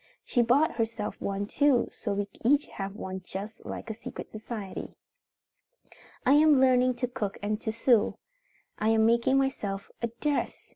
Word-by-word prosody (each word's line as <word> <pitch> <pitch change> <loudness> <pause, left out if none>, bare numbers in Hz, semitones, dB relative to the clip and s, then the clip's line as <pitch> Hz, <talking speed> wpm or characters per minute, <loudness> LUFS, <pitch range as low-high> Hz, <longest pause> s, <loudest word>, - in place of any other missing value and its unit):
She 245 - +2
bought 275 +8 +4
herself 225 -2 -2
one 200 0 -2
too 275 +2 +3
so 205 - -3
we 200 0 -1 0.2
each 285 +5 +4
have 195 0 -5
one 190 -3 -5
just 200 +5 -7
like 225 - -5
a - - -3
secret 225 - -8
society. 215 -2 -6 1.3
"I 260 - +6
am 300 -1 +6
learning 255 -1 +4
to 250 +1 -1
cook 225 -6 -4
and 210 +1 -1
to 220 - -2
sew. 230 0 +3 0.6
I 215 - +2
am 220 0 +4
making 235 +3 +3
myself 205 -8 -2
a 235 - +1
dress. 295 -1 -2
230 Hz, 160 wpm, -28 LUFS, 205-260 Hz, 1.3 s, I